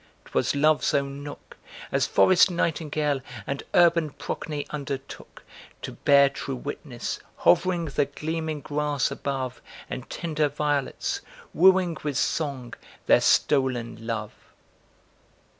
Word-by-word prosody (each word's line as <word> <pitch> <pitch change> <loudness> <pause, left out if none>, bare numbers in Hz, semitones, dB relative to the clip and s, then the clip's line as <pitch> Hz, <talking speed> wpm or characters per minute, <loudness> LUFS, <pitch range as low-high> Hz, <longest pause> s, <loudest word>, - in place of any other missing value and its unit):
'Twas - - 0
Love's 150 +1 +3
own 140 0 -1
nook, 145 0 -10 0.3
As - - +2
forest 185 +1 +5
nightingale 155 -4 -1 0.2
and 140 0 -3
urban 170 -2 +5
Procne 145 +1 -5
undertook 140 -2 -7 0.4
To - - -4
bear 140 -1 +5
true 135 -1 -5
witness; 130 -1 -5 0.3
hovering, 170 - +4
the 145 -1 0
gleaming 155 +1 -4
grass 145 -1 -1
above 135 -2 -4 0.3
And 130 - -6
tender 155 -3 -1
violets; 145 - -1 0.3
wooing 185 -2 +5
with 145 -3 -2
song, 140 -6 -1 0.3
their - - +5
stolen 120 -5 +1
love. 110 -2 -3
145 Hz, 110 wpm, -26 LUFS, 135-155 Hz, 0.4 s, forest